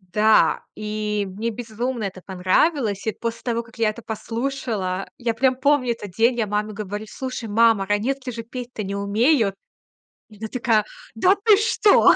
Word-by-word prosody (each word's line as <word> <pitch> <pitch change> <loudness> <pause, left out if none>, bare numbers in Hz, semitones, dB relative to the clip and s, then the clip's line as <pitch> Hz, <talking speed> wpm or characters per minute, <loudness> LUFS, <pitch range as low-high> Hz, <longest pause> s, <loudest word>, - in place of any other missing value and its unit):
Да, 210 +4 +3
и 210 -1 -2
мне 215 +5 -3
безумно 235 +1 -4
это 190 -2 -5
понравилось. 200 - +1
И 220 - +1
после 230 0 -5
того, 235 -1 -1
как 230 0 -18
я 220 -2 +3
это 225 - -9
послушала, 220 -4 -3
я 235 -2 -1
прям 255 +2 +2
помню 260 -2 +2
этот 205 -5 -8
день. 230 +5 +3
Я 220 - +1
маме 210 +1 -1
говорю: 210 +1 -5
"Слушай, 255 -2 -5
мама, 225 -2 +4
"Ранетки" 250 +6 -1
же 230 -1 -6
петь-то 245 -1 -6
не 195 - -4
умеют". 210 +3 +2 0.8
И 210 - -16
она 220 +1 -5
такая: 230 -3 +1 0.3
"Да 375 +1 +4
ты 430 -3 +7
что?" 430 -1 +5
225 Hz, 170 wpm, -23 LUFS, 210-250 Hz, 0.8 s, ты